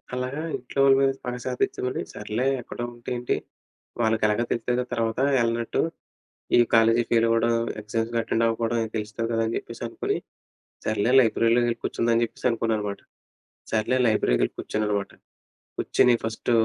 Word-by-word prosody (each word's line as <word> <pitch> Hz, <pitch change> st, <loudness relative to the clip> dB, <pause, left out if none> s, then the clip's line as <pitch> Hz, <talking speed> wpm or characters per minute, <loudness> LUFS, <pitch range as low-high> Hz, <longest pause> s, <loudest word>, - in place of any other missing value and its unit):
అలాగా 130 Hz, +4 st, -3 dB, 0.2 s
ఇంట్లో 125 Hz, +2 st, -6 dB
వాళ్ళ 135 Hz, -1 st, +6 dB
మీద 135 Hz, 0 st, +4 dB
స్పాష 125 Hz, 0 st, -5 dB
అది 125 Hz, -, +2 dB
చిన్నది 125 Hz, 0 st, -2 dB
సర్లే 105 Hz, +4 st, -3 dB, 0.2 s
ఎక్కడో 120 Hz, -, -6 dB
ఉంటే 120 Hz, 0 st, -9 dB
ఏంటి 120 Hz, 0 st, -1 dB, 0.7 s
వాళ్ళకెలాగో 110 Hz, 0 st, +2 dB
తెలుస్తది 120 Hz, +1 st, 0 dB
కదా! 125 Hz, -, 0 dB
తర్వాత 115 Hz, 0 st, -1 dB, 0.2 s
ఎళ్ళనట్టు. 115 Hz, 0 st, 0 dB, 0.8 s
ఈ -, -, +6 dB
కాలేజీ 115 Hz, +1 st, +5 dB
ఫెయిల్ 115 Hz, -1 st, +4 dB
అవ్వడం 115 Hz, +1 st, +2 dB, 0.3 s
ఎగ్జామ్స్‌కి 115 Hz, +2 st, -2 dB
అటెండ్ 115 Hz, 0 st, 0 dB
అవ్వకపోవడం 115 Hz, +1 st, 0 dB, 0.2 s
తెలుస్తది 105 Hz, +2 st, -3 dB
కదా! 115 Hz, 0 st, +1 dB
అని 115 Hz, -, -2 dB
చెప్పేసనుకుని 115 Hz, 0 st, -4 dB, 0.7 s
సర్లే 110 Hz, +3 st, +1 dB
లైబ్రరీలోకి 115 Hz, +1 st, +3 dB
ఎళ్ళి 115 Hz, -, -5 dB
కూర్చుందాం 115 Hz, 0 st, +1 dB
అని 115 Hz, -, +3 dB
చెప్పేసి 115 Hz, -, -3 dB
అనుకున్నా 115 Hz, -1 st, 0 dB
అనమాట. 100 Hz, -1 st, -4 dB, 0.7 s
సర్లే 115 Hz, +4 st, +1 dB
లైబ్రరీకి 105 Hz, -, +2 dB
ఎళ్ళి -, -, -7 dB
కూర్చొన్నానమాట. 105 Hz, -2 st, -2 dB, 0.7 s
కూర్చొని 125 Hz, -1 st, +3 dB
ఫస్ట్ 110 Hz, +2 st, -2 dB
115 Hz, 150 wpm, -25 LUFS, 110-120 Hz, 0.8 s, వాళ్ళ